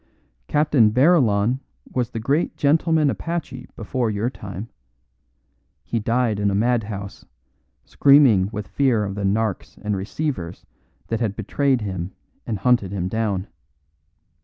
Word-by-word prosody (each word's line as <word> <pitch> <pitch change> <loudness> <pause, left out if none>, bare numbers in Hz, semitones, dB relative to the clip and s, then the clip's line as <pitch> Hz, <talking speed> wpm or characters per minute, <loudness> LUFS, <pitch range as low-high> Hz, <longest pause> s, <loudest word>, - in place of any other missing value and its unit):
Captain 150 -7 +3
Barillon 125 - +3 0.3
was 125 -2 0
the 115 - -5
great 140 +9 0
gentleman 155 0 +3
apache 165 -7 -5
before 120 +1 -2
your 110 +4 -1
time; 100 -2 -7 1.2
he 115 - -2
died 115 -1 0
in 100 0 +2
a 100 - 0
madhouse, 105 -3 -1 0.6
screaming 135 -10 +5
with 105 -3 -5
fear 125 -2 +1
of 100 -1 -3
the 105 - -5
"narks" 100 +1 -1
and 105 -1 -1
receivers 95 - -4 0.4
that 115 - -1
had 110 -4 -1
betrayed 130 +4 0
him 95 -3 -4 0.3
and 110 - -1
hunted 105 -2 +2
him 95 -3 -2
down. 105 -3 -1
110 Hz, 130 wpm, -22 LUFS, 100-130 Hz, 1.2 s, screaming